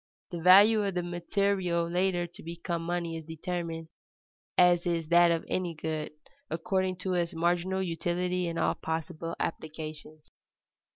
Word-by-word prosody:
The 170 -2 -4
value 205 +5 +7
of 195 -2 -2
the 180 - 0
material 175 0 0
later 175 0 +1
to 175 - -12
become 170 +1 -4
money 170 -1 -2
is 160 - -7
determined, 165 0 -5 0.7
as 175 -1 +5
is 165 -2 -1
that 175 0 +6
of 165 -1 0
any 175 -3 -2
good, 155 0 -3 0.4
according 185 +3 -1
to 185 0 -1
its 170 -1 -1
marginal 175 +3 +1
utility 180 +1 -1
in 165 0 -3
all - - +2
possible 160 +1 -4
applications. 155 -1 -6
175 Hz, 140 wpm, -29 LUFS, 165-180 Hz, 0.7 s, value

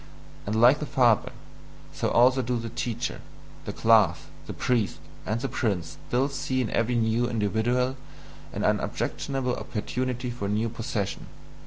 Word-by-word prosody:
And 110 +2 0
like 125 +5 +6
the 150 - -4
father, 125 -7 +3 0.6
so - - -1
also 125 +2 +5
do 125 0 -1
the 115 0 -4
teacher, 120 0 -3 0.4
the - - -3
class, 105 -7 +4 0.3
the - - -4
priest, 120 -6 0 0.3
and 110 +3 0
the 135 - -1
prince 95 -10 -2
still 130 +3 +2
see 135 -2 -2
in 120 -4 -1
every 115 +1 +1
new 115 +1 +1
individual 120 +4 0 0.5
an - - -4
unobjectionable 135 -3 -1
opportunity 125 +2 -3
for 115 -4 -4
a - - -2
new 110 +3 0
possession. 110 -3 -4
120 Hz, 150 wpm, -26 LUFS, 110-125 Hz, 0.6 s, like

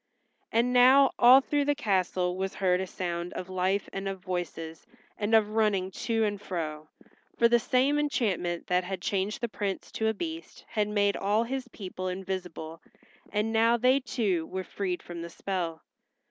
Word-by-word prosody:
And 240 +2 +2
now 260 +2 +7
all 250 +3 +8
through 290 +1 0
the 290 0 +2
castle 185 -7 0
was 190 +1 -3
heard 185 -2 +2
a 190 - -3
sound 175 -1 -4
of 185 - -6
life 185 +2 0
and 195 0 -4
of 195 -1 -5
voices 175 -3 -5 0.3
and 215 +1 +1
of 215 -1 +4
running 210 -4 +1
to 225 +3 -1
and 205 -2 -1
fro. 155 -5 -5 0.5
For 235 - +5
the 240 0 +4
same 270 +4 +2
enchantment 200 - -1
that 180 0 +1
had 190 0 -4
changed 195 +3 -2
the 235 - 0
Prince 205 -3 -4
to 220 - -1
a 220 - +2
Beast 330 +5 -7
had 210 -2 0
made 205 -1 +1
all 210 +3 +1
his 260 +2 -4
people 185 -5 -6
invisible, 180 -3 -5 0.5
and 215 +2 0
now, 230 +1 +4
they 255 +3 +4
too 205 -11 -1
were 190 0 -4
freed 185 -2 -3
from 175 -1 -7
the 170 - -6
spell. 170 -3 -4
200 Hz, 175 wpm, -28 LUFS, 180-230 Hz, 0.5 s, all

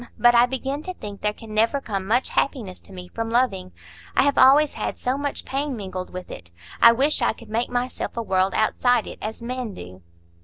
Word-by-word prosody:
But 240 0 +5
I 240 +1 +6
begin 270 +3 -3
to 370 +3 -6
think 205 - -8
there 210 - +1
can 215 +1 -11
never 225 +6 +2
come 195 -7 -4
much 245 +5 +2
happiness 220 -10 -2
to - - -16
me 180 -1 -9
from 225 +4 -4
loving; 205 -7 0 0.5
I - - +6
have 285 0 +2
always 280 +3 +6
had - - -4
so 250 +1 -1
much 285 0 -3
pain 275 0 -2
mingled 185 -3 -6
with 185 0 -8
it. 85 -1 -9 0.3
I 235 - +9
wish 275 +5 +1
I 240 - +2
could 225 0 -15
make 230 +3 -1
myself 245 0 -3
a 230 - -1
world 190 -2 +1
outside 245 +2 +2
it, - - -9
as 220 +2 -6
men 245 -3 -4
do." 90 +1 -11
230 Hz, 220 wpm, -23 LUFS, 200-260 Hz, 0.5 s, I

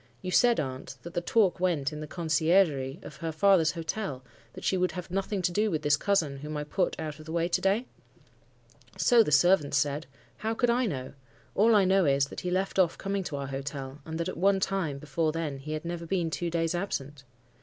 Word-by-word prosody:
You 185 - -3
said, 240 +4 +4
aunt, 130 -3 -5
that 170 - -8
the 175 - -1
talk 195 0 +2
went 160 -7 0
in 150 - -6
the 155 - -6
conciergerie 155 -4 +2
of - - -10
her 165 +2 -3
father's 175 -1 +4
hotel, 165 -4 -4 0.3
that - - -10
she - - +1
would 180 0 +1
have 180 -1 -7
nothing 195 0 -2
to 175 - +2
do 210 +4 +1
with 155 -5 -2
this 145 0 +4
cousin 160 -5 0
whom 150 +2 -5
I 150 - -2
put 175 +5 -1
out 155 -1 -5
of 155 - -12
the - - -6
way 170 0 +1
to 175 - 0
day?' 200 +6 +2 1.1
"'So 240 -2 +5
the 210 - +1
servants 150 -2 +4
said. 145 +1 0 0.3
How 220 +1 -2
could 240 +1 +2
I 245 0 +1
know? 130 -8 -4 0.4
All 220 +2 +4
I 200 -2 +5
know 190 0 +4
is, 140 -1 +3
that - - -7
he 180 - -3
left 190 +2 -1
off 175 -3 +3
coming 195 0 -2
to 150 - -4
our 140 0 -3
hotel, 135 0 -6
and 160 +2 -5
that 170 - -1
at - - -5
one 195 +2 +3
time 190 -7 -1
before 150 +2 -1
then 155 -4 -3
he 155 +3 -6
had 155 +2 -4
never 170 0 -4
been 170 -3 0
two 175 +2 -2
days 165 0 0
absent. 145 -6 -4
165 Hz, 230 wpm, -28 LUFS, 150-190 Hz, 1.1 s, So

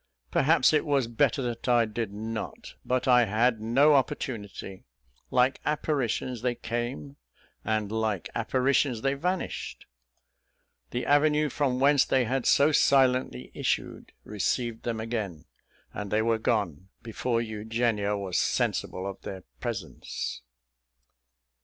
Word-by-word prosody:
Perhaps 160 +3 +4
it 150 - +3
was 140 -4 +1
better 120 +3 +1
that 120 0 -3
I 120 -1 +4
did 110 -1 -4
not; 110 +2 -6
but 130 0 -1
I 125 -2 +6
had 110 +2 +1
no 135 +7 +4
opportunity. 105 -7 -2 0.5
Like 125 +2 +2
apparitions 135 -5 -1
they 125 -1 0
came, 115 - -4 0.5
and 110 -2 -1
like 110 -5 -1
apparitions 130 -2 +1
they 135 0 +2
vanished. 180 +6 -3 1.0
The 125 - -3
avenue 150 +1 +3
from 130 -2 0
whence 140 0 +5
they 130 -2 +2
had 130 +2 -1
so 145 +2 +5
silently 130 - +2
issued, - - -2
received 115 +3 -2
them 115 -2 -2
again, 110 -8 -4 0.5
and 105 -1 -5
they 110 +2 +1
were 115 0 +1
gone 100 -6 -1
before 115 +1 -1
Eugenia 110 -2 -1
was 95 -3 -1
sensible 95 - -1
of 100 0 -7
their 95 -2 -7 0.2
presence. - - -5
120 Hz, 125 wpm, -27 LUFS, 110-130 Hz, 1.0 s, I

